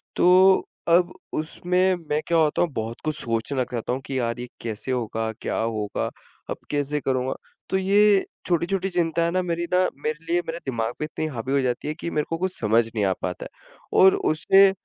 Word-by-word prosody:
तो 185 Hz, +1 st, +5 dB, 0.2 s
अब 175 Hz, +1 st, +4 dB, 0.2 s
उसमें 180 Hz, +4 st, +1 dB
मैं 150 Hz, +1 st, +1 dB
क्या 170 Hz, -, +3 dB
होता 155 Hz, -2 st, +3 dB
हूँ 175 Hz, -, +2 dB
बहुत 115 Hz, +1 st, -4 dB
कुछ 155 Hz, -, 0 dB
सोचना 115 Hz, +3 st, -1 dB
चाहता 120 Hz, -1 st, -3 dB
हूँ 130 Hz, -, -3 dB
कि 130 Hz, -1 st, -2 dB
यार 115 Hz, 0 st, -2 dB
ये 125 Hz, -, -5 dB
कैसे 115 Hz, +3 st, -4 dB
होगा? 115 Hz, -2 st, -1 dB
क्या -, -, -2 dB
होगा? 110 Hz, -2 st, -2 dB, 0.4 s
अब -, -, -3 dB
कैसे 145 Hz, 0 st, 0 dB
करूँगा? 130 Hz, 0 st, 0 dB, 0.4 s
तो 190 Hz, -, +1 dB
ये 200 Hz, +1 st, +4 dB, 0.2 s
छोटी-छोटी 180 Hz, +2 st, 0 dB
चिंता 170 Hz, -2 st, +1 dB
है 170 Hz, -, +1 dB
ना 185 Hz, +1 st, +1 dB
मेरी 170 Hz, -1 st, -2 dB
ना -, -, +5 dB, 0.3 s
मेरे 155 Hz, +1 st, -3 dB
लिए 170 Hz, +1 st, +1 dB
मेरे 165 Hz, -, -3 dB
दिमाग 115 Hz, -3 st, -2 dB
पे 150 Hz, -, -1 dB
इतनी 155 Hz, 0 st, -4 dB
हावी 130 Hz, -2 st, -4 dB
हो 140 Hz, -, +3 dB
जाती 125 Hz, +2 st, -2 dB
है 150 Hz, -, -1 dB
कि 170 Hz, -, -3 dB
मेरे 150 Hz, -, 0 dB
को 165 Hz, -, -1 dB
कुछ 185 Hz, +2 st, -3 dB
समझ 115 Hz, +1 st, +3 dB
नहीं 105 Hz, -, +1 dB
आ 95 Hz, -, +2 dB
पाता 90 Hz, -1 st, -4 dB
है -, -, -6 dB
और 190 Hz, 0 st, +7 dB, 0.2 s
उसे 195 Hz, +5 st, +5 dB
150 Hz, 205 wpm, -24 LUFS, 120-175 Hz, 0.4 s, और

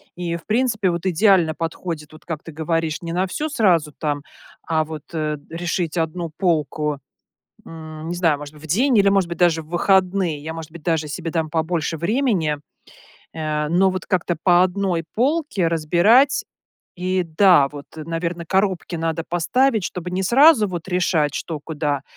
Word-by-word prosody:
И, 175 Hz, -1 st, -3 dB
в 170 Hz, -, -9 dB
принципе, 220 Hz, -3 st, +1 dB
вот 170 Hz, +1 st, -4 dB
идеально 185 Hz, -3 st, +3 dB
подходит, 165 Hz, -2 st, -5 dB
вот, 155 Hz, -, -15 dB
как 160 Hz, -3 st, -5 dB
ты 165 Hz, -, -9 dB
говоришь: 160 Hz, 0 st, -2 dB
не 165 Hz, -1 st, -5 dB
на 180 Hz, +2 st, +1 dB
всю 300 Hz, +11 st, -3 dB
сразу, 180 Hz, -, +2 dB
там, 145 Hz, -2 st, -2 dB, 0.5 s
а 160 Hz, -1 st, +2 dB
вот, 155 Hz, -2 st, -8 dB
э, 155 Hz, -2 st, -2 dB
решить, 170 Hz, 0 st, -2 dB
1 165 Hz, +1 st, -2 dB
полку, 150 Hz, -4 st, 0 dB, 0.7 s
м, 160 Hz, -1 st, -9 dB
не 175 Hz, -, -2 dB
знаю, 165 Hz, -4 st, +2 dB
может 145 Hz, +1 st, -9 dB
быть, 150 Hz, -, -15 dB
в -, -, -7 dB
день, 240 Hz, -, +2 dB
или, 200 Hz, -1 st, +5 dB
может 195 Hz, -3 st, +2 dB
быть, 170 Hz, -1 st, -6 dB
даже 170 Hz, -2 st, +3 dB
в 155 Hz, -, -19 dB
выходные. 185 Hz, -1 st, +2 dB
Я, 160 Hz, +2 st, -5 dB
может 165 Hz, -1 st, -8 dB
быть, 165 Hz, 0 st, -12 dB
даже 160 Hz, -2 st, 0 dB
себе 165 Hz, +2 st, -4 dB
дам 160 Hz, -1 st, -1 dB
побольше 160 Hz, 0 st, -1 dB
времени, 175 Hz, -, 0 dB, 0.7 s
э, 150 Hz, -1 st, -2 dB
но 185 Hz, +4 st, +3 dB
вот 185 Hz, 0 st, -5 dB
как-то 175 Hz, -2 st, 0 dB
по 180 Hz, -1 st, +5 dB
1 185 Hz, -2 st, 0 dB
полке 275 Hz, -, +1 dB
разбирать. 175 Hz, -, +3 dB, 0.5 s
И, 185 Hz, 0 st, 0 dB
да, 165 Hz, -3 st, +5 dB
вот, 145 Hz, 0 st, -10 dB
наверно, 165 Hz, +2 st, -4 dB
коробки 190 Hz, -1 st, 0 dB
надо 165 Hz, 0 st, -2 dB
поставить, 220 Hz, +6 st, +1 dB
чтобы 180 Hz, 0 st, -5 dB
не 185 Hz, +1 st, -1 dB
сразу 255 Hz, -, +6 dB
вот 175 Hz, -3 st, -5 dB
решать, 170 Hz, -5 st, +1 dB
что 160 Hz, -3 st, -4 dB
куда, 145 Hz, -2 st, -2 dB
170 Hz, 175 wpm, -21 LUFS, 155-185 Hz, 0.7 s, сразу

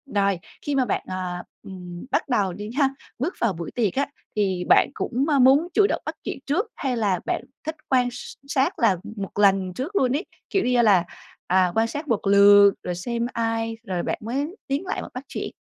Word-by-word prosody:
Rồi, 200 Hz, -2 st, +2 dB, 0.2 s
khi 290 Hz, -, -2 dB
mà 260 Hz, -2 st, +3 dB
bạn, 210 Hz, -, -1 dB
à, 180 Hz, -1 st, -4 dB, 0.2 s
ừm, 180 Hz, -2 st, -9 dB
bắt -, -, 0 dB
đầu 200 Hz, -7 st, +1 dB
đi 205 Hz, +3 st, -7 dB
ha, 275 Hz, -3 st, +4 dB, 0.3 s
bước 320 Hz, +9 st, -1 dB
vào 230 Hz, -4 st, +2 dB
buổi 165 Hz, -1 st, -6 dB
tiệc 215 Hz, -7 st, 0 dB
á, 280 Hz, -, +1 dB, 0.3 s
thì 190 Hz, -4 st, 0 dB
bạn -, -, +6 dB
cũng, 255 Hz, +4 st, -1 dB
ơ, 285 Hz, -2 st, +3 dB
muốn 270 Hz, +6 st, +5 dB
chủ 410 Hz, -, +5 dB
động -, -, -2 dB
bắt -, -, -4 dB
chuyện -, -, -4 dB
trước 355 Hz, -, 0 dB
hay 260 Hz, -4 st, -2 dB
là 200 Hz, -5 st, +1 dB
bạn -, -, -1 dB, 0.2 s
thích 315 Hz, +1 st, -3 dB
quan 250 Hz, -2 st, +3 dB
s 245 Hz, -, -8 dB
sát 270 Hz, -1 st, 0 dB
là 215 Hz, -6 st, +4 dB, 0.2 s
một 200 Hz, 0 st, -5 dB
lần 195 Hz, -2 st, +3 dB
trước 285 Hz, -, -5 dB
luôn 260 Hz, -10 st, +3 dB
ấy, 350 Hz, -, -5 dB, 0.2 s
kiểu 390 Hz, -, +1 dB
như 250 Hz, -1 st, +3 dB
là, 200 Hz, -6 st, +5 dB, 0.4 s
à, 185 Hz, 0 st, +3 dB
quan 225 Hz, +1 st, +3 dB
sát 295 Hz, +6 st, -5 dB
một 230 Hz, -7 st, +1 dB
lượt 200 Hz, 0 st, +7 dB
rồi 180 Hz, -, -3 dB
xem 235 Hz, +6 st, -2 dB
ai 225 Hz, -1 st, -1 dB
rồi 185 Hz, -5 st, -3 dB
bạn -, -, -2 dB
mới 275 Hz, -, -3 dB
tiến 280 Hz, +7 st, -1 dB
lại 375 Hz, -, -3 dB
bạn -, -, -9 dB
bắt 255 Hz, -, -6 dB
chuyện? -, -, -4 dB
225 Hz, 220 wpm, -24 LUFS, 195-270 Hz, 0.4 s, lượt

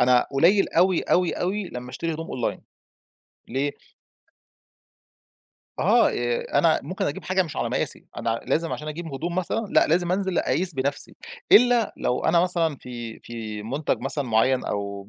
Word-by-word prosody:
أنا 125 Hz, 0 st, +4 dB
قليّل 175 Hz, +9 st, +4 dB
أوي، 185 Hz, -2 st, +3 dB
أوي، 180 Hz, -1 st, +2 dB
أوي 190 Hz, +1 st, -2 dB
لمّا 125 Hz, 0 st, -7 dB
أشتري 165 Hz, +5 st, -3 dB
هدوم 160 Hz, +1 st, -6 dB
Online، 125 Hz, -2 st, -3 dB, 0.9 s
ليه؟ 140 Hz, +4 st, -1 dB, 2.1 s
آه -, -, +4 dB
ي 120 Hz, 0 st, -1 dB
أنا 165 Hz, -2 st, +2 dB
ممكن 180 Hz, +7 st, -3 dB
أجيب 145 Hz, -, -4 dB
حاجة 190 Hz, 0 st, +2 dB
مش 160 Hz, -, -8 dB
على -, -, -1 dB
مقاسي -, -, -3 dB
أنا 115 Hz, 0 st, -1 dB
لازم 165 Hz, +1 st, 0 dB
عشان 150 Hz, -, -5 dB
أجيب 160 Hz, 0 st, -6 dB
هدوم 170 Hz, +5 st, -3 dB
مثلًا، 185 Hz, +5 st, -1 dB
لأ -, -, +4 dB
لازم 175 Hz, +2 st, +1 dB
أنزِل 190 Hz, -2 st, 0 dB
أقيس 180 Hz, -1 st, 0 dB
بنَفْسي، 140 Hz, +2 st, -3 dB, 0.4 s
إلّا 240 Hz, -1 st, +6 dB
لو 125 Hz, -, -1 dB
أنا 170 Hz, -, +4 dB
مثلًا 170 Hz, -4 st, +1 dB
في 120 Hz, -3 st, -8 dB
في 110 Hz, -3 st, -7 dB
مُنتَج 140 Hz, +7 st, -1 dB
مثلًا 135 Hz, +2 st, -2 dB
معيّن 125 Hz, +3 st, +2 dB
أو 100 Hz, -1 st, -4 dB
150 Hz, 160 wpm, -24 LUFS, 125-180 Hz, 2.1 s, إلّا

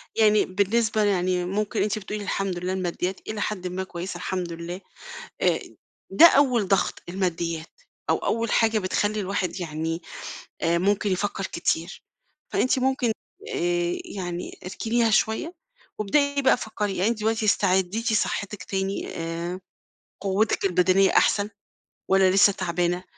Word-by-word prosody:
يعني 215 Hz, -1 st, +4 dB
بالنسبة 215 Hz, +3 st, +1 dB
يعني 180 Hz, -2 st, +1 dB
مُمكن 210 Hz, +3 st, -1 dB
أنتِ 215 Hz, +1 st, -1 dB
بتقولي 210 Hz, +1 st, -5 dB
الحمد 195 Hz, -2 st, -2 dB
لله 180 Hz, +1 st, -2 dB
الماديات 185 Hz, 0 st, -2 dB
إلي 215 Hz, -1 st, -3 dB
حدٍ 185 Hz, -4 st, -2 dB
ما 185 Hz, +1 st, -3 dB
كويسة 185 Hz, +1 st, -6 dB
الحمد 180 Hz, -3 st, -3 dB
لله 170 Hz, +3 st, -6 dB, 0.6 s
أ -, -, +3 dB, 0.5 s
ده 335 Hz, -, +9 dB
أول 255 Hz, -, +4 dB
ضغط 195 Hz, -, +1 dB
الماديات، 170 Hz, -, -3 dB, 0.3 s
أو -, -, +4 dB
أول 230 Hz, 0 st, -1 dB
حاجة 225 Hz, -1 st, +3 dB
بتخلّي 205 Hz, +2 st, 0 dB
الواحد 185 Hz, -2 st, -2 dB
يعني، 165 Hz, +1 st, -3 dB, 0.6 s
آآ 170 Hz, +1 st, +2 dB
مُمكن 200 Hz, +2 st, +1 dB
يفكر 195 Hz, +1 st, -1 dB
كتير. 170 Hz, +1 st, -2 dB, 0.5 s
فأنتِ 255 Hz, -, +2 dB
مُمكن 260 Hz, -3 st, +1 dB, 0.4 s
آآ 175 Hz, 0 st, 0 dB
يعني 175 Hz, -3 st, -5 dB
اركنيها 225 Hz, +5 st, 0 dB
شوية 220 Hz, +11 st, +1 dB, 0.4 s
وابدئي 285 Hz, +7 st, +1 dB
بقى 265 Hz, -, +5 dB
فكري، 210 Hz, -4 st, -3 dB
يعني 195 Hz, +5 st, +2 dB
أنتِ 235 Hz, -, -2 dB
دلوقتي 220 Hz, 0 st, 0 dB
استعديتِ 200 Hz, +3 st, +2 dB
صحتِك 205 Hz, -2 st, -1 dB
تاني 195 Hz, 0 st, -2 dB
آآ 170 Hz, +2 st, -4 dB, 0.6 s
قوتِك 200 Hz, +3 st, +1 dB
البدنية 190 Hz, +1 st, +4 dB
أحسن 205 Hz, 0 st, +3 dB, 0.6 s
والّا 190 Hz, -1 st, +4 dB
لسه 200 Hz, +1 st, +6 dB
تعبانة؟ 175 Hz, -1 st, -1 dB
195 Hz, 135 wpm, -25 LUFS, 180-215 Hz, 0.6 s, ده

